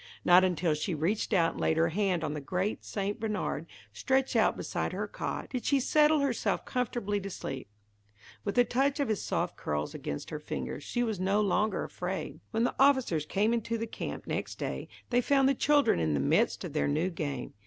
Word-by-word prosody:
Not 180 +1 +7
until 175 -3 +1
she 155 +4 -2
reached 175 +11 -1
out 170 -5 +3
and - - -7
laid 160 - +2
her 165 0 +3
hand 185 -1 0
on 150 -2 -1
the 150 - -4
great 180 +8 -2
St. 200 0 -3
Bernard 215 -1 -2 0.3
stretched 265 0 +1
out - - +3
beside - - -3
her - - -2
cot, - - -5
did 250 -2 -3
she 280 - +3
settle 300 +3 +4
herself 270 -5 0
comfortably 230 -4 -1
to 195 0 -6
sleep. 135 - -6 0.8
With 200 - -2
the 245 - +6
touch 270 +4 +1
of 280 - 0
his 215 - 0
soft - - -1
curls 75 0 -2
against 70 - -5
her - - -4
fingers, 65 0 -5
she 240 - -1
was 220 -5 -2
no 195 +3 +2
longer 210 0 +1
afraid. 185 +1 -4
When 225 0 0
the 245 - +1
officers 260 - +3
came 210 +6 +2
into 230 0 -1
the 225 - -2
camp 225 - -6
next - - -3
day, - - -4 0.2
they 245 0 +4
found 270 +1 +3
the 275 - +4
children 290 - +3
in 80 -2 +1
the - - +1
midst - - +2
of - - -6
their 70 - +1
new 175 - 0
game. 145 -6 -4
205 Hz, 205 wpm, -30 LUFS, 165-245 Hz, 0.8 s, Not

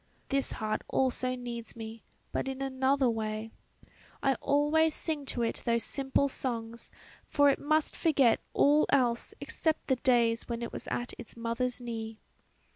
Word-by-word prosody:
This 275 -1 0
heart 215 -1 -2
also 255 -1 0
needs 240 -2 -6
me, 225 0 -8 0.3
but - - -2
in 265 0 -4
another 265 0 +2
way; 220 -1 -2 0.7
I 275 - +4
always 300 +2 +3
sing 305 -3 -2
to 245 -3 0
it 230 - -2
those 235 -1 +2
simple 275 +2 +1
songs, 235 -3 -4 0.3
for 285 -1 +4
it - - -2
must 310 +1 +1
forget 275 -8 +3
all 295 +2 +4
else 245 -4 +2
except 315 -3 -1
the 260 - +3
days 235 -2 +2
when 235 0 -3
it 235 - -5
was - - -6
at 245 0 -3
its 235 - -10
mother's 235 +2 -1
knee." 225 -2 -5
250 Hz, 155 wpm, -30 LUFS, 230-275 Hz, 0.7 s, I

